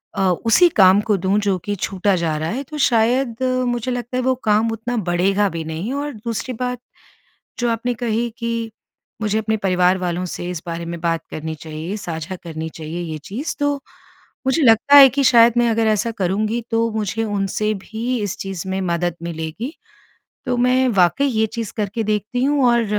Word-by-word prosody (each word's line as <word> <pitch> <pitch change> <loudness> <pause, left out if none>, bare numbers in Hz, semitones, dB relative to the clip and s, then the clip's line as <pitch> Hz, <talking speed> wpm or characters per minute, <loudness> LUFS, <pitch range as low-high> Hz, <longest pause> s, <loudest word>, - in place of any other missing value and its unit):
अ, - - -4 0.3
उसी 290 +11 +6
काम 195 - +6
को 210 - +4
दूँ 190 +3 +1
जो 200 -2 0
कि 205 - -1
छूटा 195 +1 0
जा 165 -3 -1
रहा 155 +1 -2
है, 260 +5 -3
तो 300 +2 -8
शायद 235 0 +2 0.3
मुझे 240 +1 -1
लगता 245 0 -3
है - - +1
वो 260 +1 +3
काम 215 +1 +3
उतना 225 +2 -3
बढ़ेगा 195 +1 +1
भी 165 -2 -5
नहीं। 165 +10 -4
और 290 +1 -3
दूसरी 230 +2 -4
बात 250 -1 -2 0.8
जो 240 -1 +1
आपने 230 +2 -1
कही 235 0 -1
कि 230 -1 -3 0.5
मुझे 215 0 0
अपने 220 0 -1
परिवार 185 -2 +2
वालों 180 -1 -2
से 175 0 -5
इस 175 -3 -5
बारे 170 0 -4
में 170 0 -5
बात 165 -1 0
करनी 160 0 -5
चाहिए, 160 +5 -6
साझा 165 -2 -5
करनी 160 -1 -5
चाहिए 160 +2 -6
ये 160 -2 -4
चीज़, 250 +11 -4
तो 290 0 +1 0.7
मुझे 265 +5 +2
लगता 245 +4 +5
है 275 -1 +10
कि 275 +3 0
शायद 235 -2 +6
मैं 240 0 +4
अगर 225 0 +1
ऐसा 215 +2 +1
करूँगी, 215 +3 -1
तो 230 0 +2
मुझे 215 0 -2
उनसे 205 0 -1
भी 225 +5 -3
इस 205 0 -3
चीज़ 190 -2 -5
में 190 0 -1
मदद 175 -1 -1
मिलेगी। 170 - -5 0.7
तो 250 -1 0
मैं 255 +1 +3
वाक़ई 200 +5 +3
ये 220 -4 +1
चीज़ 230 -4 -4
करके 210 +2 -1
देखती 215 +5 -1
हूँ। 285 -1 +2
और 235 -1 +3
215 Hz, 190 wpm, -20 LUFS, 180-240 Hz, 0.8 s, है